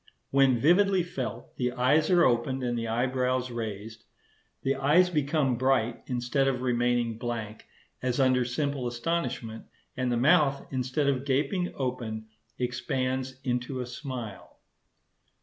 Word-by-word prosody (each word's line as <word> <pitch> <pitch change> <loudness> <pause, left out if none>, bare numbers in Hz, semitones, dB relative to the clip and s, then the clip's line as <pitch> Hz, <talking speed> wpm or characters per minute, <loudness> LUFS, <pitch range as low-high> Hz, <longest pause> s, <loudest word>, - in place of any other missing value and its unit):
When 135 -2 +4
vividly 185 - +4
felt, 140 -9 -6
the 125 -1 0
eyes 135 +5 +3
are 175 -2 +5
opened 130 +2 +1
and 120 -1 -1
the 115 -1 -2
eyebrows 125 +2 0
raised; 110 -1 -6 0.6
the 135 - +2
eyes 155 +7 +4
become 145 -4 +1
bright, 130 -3 +1
instead 125 +2 0
of 130 -2 -1
remaining 120 -2 +1
blank, 115 -3 -5 0.3
as 125 +1 -1
under 130 -1 +4
simple 135 +1 -2
astonishment; 120 -3 -3 0.3
and 125 -1 -1
the 120 - +1
mouth, 140 +2 +3
instead 130 +2 -1
of 135 -2 +1
gaping 150 +7 0
open, 120 -4 -3 0.3
expands 130 +1 -2
into 125 0 -2
a 125 - -2
smile. 120 - -7
130 Hz, 130 wpm, -28 LUFS, 120-140 Hz, 0.6 s, are